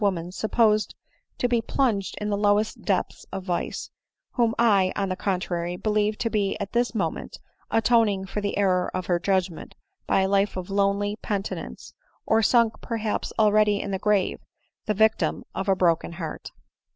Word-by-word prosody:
woman 180 -4 0
supposed 215 +1 +1 0.4
to 245 - +1
be 240 -1 +1
plunged 225 -5 0
in 210 - -3
the - - +2
lowest 205 +1 +1
depths - - -1
of 195 -1 -5
vice, 180 -2 -3 0.4
whom 235 -2 +1
I, 200 -5 +4
on 195 -1 -1
the 185 - -1
contrary, 180 -2 -2
believe 210 +1 0
to 230 - -1
be 200 -3 0
at 200 -1 -4
this 240 0 +1
moment - - -3 0.3
atoning 225 -4 +2
for 210 +2 -4
the 200 0 -2
error 185 -3 +2
of 185 -1 -2
her 175 -1 +1
judgment 185 -2 -1 0.3
by - - +3
a 190 - +2
life 200 0 +1
of 185 +1 -5
lonely 200 +1 +1
penitence, 200 -1 -5 0.3
or 220 0 +3
sunk 230 -1 +3
perhaps 225 -2 -2
already 210 -1 +4
in 200 - -4
the 190 - -2
grave, 210 -2 +1 0.5
the 210 - +1
vic 220 +2 +4
tim - - -1
of 190 +1 -3
a 195 - +4
broken 170 -2 +1
heart." 170 -3 -6
205 Hz, 175 wpm, -25 LUFS, 190-215 Hz, 0.5 s, I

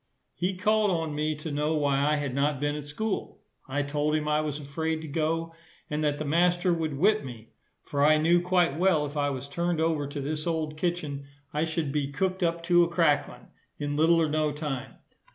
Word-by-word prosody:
He 180 +1 -2
called 215 +2 +2
on 165 -4 -1
me 155 +1 -1
to 150 +1 -6
know 150 +2 0
why 140 -2 +2
I 150 +2 +2
had 145 -3 -2
not 140 +1 +1
been 145 +1 0
at 150 -1 -6
school? 210 +7 -4 0.3
I 145 +2 -1
told 150 +1 0
him 150 -1 -1
I 150 0 +2
was 150 -1 -3
afraid 160 +3 -2
to - - -6
go, 165 +2 -1 0.4
and 150 +1 -1
that 145 -1 +1
the 155 - -4
master 175 +4 +2
would 160 -4 -2
whip 210 +7 +3
me; 115 -3 -10 0.3
for 140 -1 -1
I 155 +1 +6
knew 170 +3 +4
quite 175 -4 +2
well 175 -5 +3
if 145 +1 -7
I 145 -1 +1
was 135 0 -5
turned 170 +3 -1
over 160 -3 +1
to 145 +1 -5
this 150 +3 -3
old 160 -2 -1
Kitchen, 155 -4 -3 0.3
I 150 +2 +1
should 160 -3 -2
be 140 -1 -1
cooked 190 +4 -1
up 170 -1 0
to 175 0 +5
a - - +2
cracklin, 165 -4 +1 0.3
in 145 0 -3
little 165 +2 +4
or 160 - +3
no 155 0 +1
time. 145 -4 -5
155 Hz, 215 wpm, -27 LUFS, 145-170 Hz, 0.4 s, I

